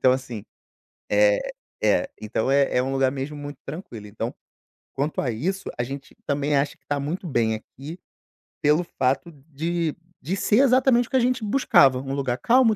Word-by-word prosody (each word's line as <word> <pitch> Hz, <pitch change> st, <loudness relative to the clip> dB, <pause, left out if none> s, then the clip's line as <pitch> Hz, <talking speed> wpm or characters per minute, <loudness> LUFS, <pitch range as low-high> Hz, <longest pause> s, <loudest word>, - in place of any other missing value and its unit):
Então, 130 Hz, -, +6 dB
assim 125 Hz, -5 st, -4 dB, 0.7 s
É -, -, +3 dB, 0.3 s
é, 275 Hz, -, +3 dB
então 110 Hz, +4 st, -1 dB
é 140 Hz, -2 st, +3 dB
é 125 Hz, -, +3 dB
um 135 Hz, -, -2 dB
lugar 135 Hz, -1 st, +2 dB
mesmo 140 Hz, +2 st, -4 dB
muito 145 Hz, 0 st, -7 dB
tranquilo. 135 Hz, -, -7 dB
Então, 105 Hz, +1 st, -4 dB, 0.6 s
quanto 145 Hz, +3 st, -1 dB
a 125 Hz, -, 0 dB
isso, 190 Hz, -, -2 dB
a -, -, +2 dB
gente 135 Hz, +2 st, -7 dB
também 145 Hz, 0 st, +1 dB
acha 140 Hz, +1 st, 0 dB
que -, -, -46 dB
tá 145 Hz, -1 st, 0 dB
muito 165 Hz, +6 st, -3 dB
bem 115 Hz, -5 st, +1 dB
aqui 140 Hz, +9 st, -9 dB, 0.6 s
pelo 150 Hz, +4 st, +4 dB, 0.2 s
fato 135 Hz, +6 st, +1 dB, 0.2 s
de 165 Hz, +2 st, -1 dB, 0.3 s
de 170 Hz, +8 st, -2 dB
ser 205 Hz, +2 st, +2 dB
exatamente 255 Hz, -2 st, +4 dB
o -, -, -25 dB
que 265 Hz, -, +3 dB
a -, -, +5 dB
gente 250 Hz, -1 st, +1 dB
buscava, 170 Hz, -, +4 dB
um 135 Hz, +1 st, -4 dB
lugar 130 Hz, -3 st, -1 dB
calmo, 235 Hz, -, +4 dB
145 Hz, 185 wpm, -24 LUFS, 130-190 Hz, 0.7 s, Então